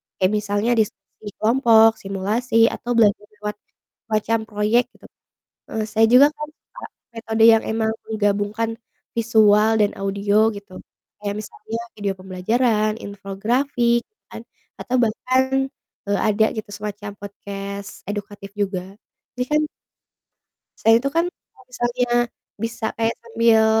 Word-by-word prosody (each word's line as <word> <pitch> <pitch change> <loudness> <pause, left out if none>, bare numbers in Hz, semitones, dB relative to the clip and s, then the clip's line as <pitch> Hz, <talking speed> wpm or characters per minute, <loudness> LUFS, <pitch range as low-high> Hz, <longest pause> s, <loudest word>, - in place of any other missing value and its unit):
kayak 185 +1 +1
misalnya 205 +3 -1
diskusi 210 0 -4
kelompok, 225 -1 +5
simulasi, 210 +5 -3 0.2
atau 245 - -5
belajar 205 -2 +3
lewat 210 0 -5 0.5
semacam 220 +1 +1
proyek, 215 +3 +2
gitu. - - -18 0.7
Heeh, 220 -1 -1
saya 220 +1 +3
juga 270 +3 +9
kan 300 0 -5
suka - - -14 0.3
metode 225 -1 -1
yang 225 -1 +6
emang 220 0 0
menggabungkan 210 +1 -1 0.4
visual 220 -2 +4
dan 205 - +2
audio 200 +3 +1
gitu, 200 -2 -11 0.5
kayak 200 0 -1
misalnya 220 +2 -7 0.2
video 205 -2 -1
pembelajaran, 215 +4 0
infografik 235 +5 0 0.2
kan, - - -9 0.4
atau 255 - -1
bahkan, 255 +4 +2 0.6
eee, 200 0 +1
ada 215 +1 +3
gitu, 220 - -4
semacam 205 0 -6
podcast 200 0 -7 0.2
edukatif 205 -1 -6
juga. 190 -3 -1 0.5
Jadi 250 - +1
kan 300 0 +3 1.2
saya 225 - +5
itu 275 +3 -1
kan 335 +1 +3
kalau - - -25
misalnya 245 0 -1 0.6
bisa 230 0 -3
kayak 225 0 +1
sambil 230 -1 +3
215 Hz, 125 wpm, -22 LUFS, 205-230 Hz, 1.2 s, juga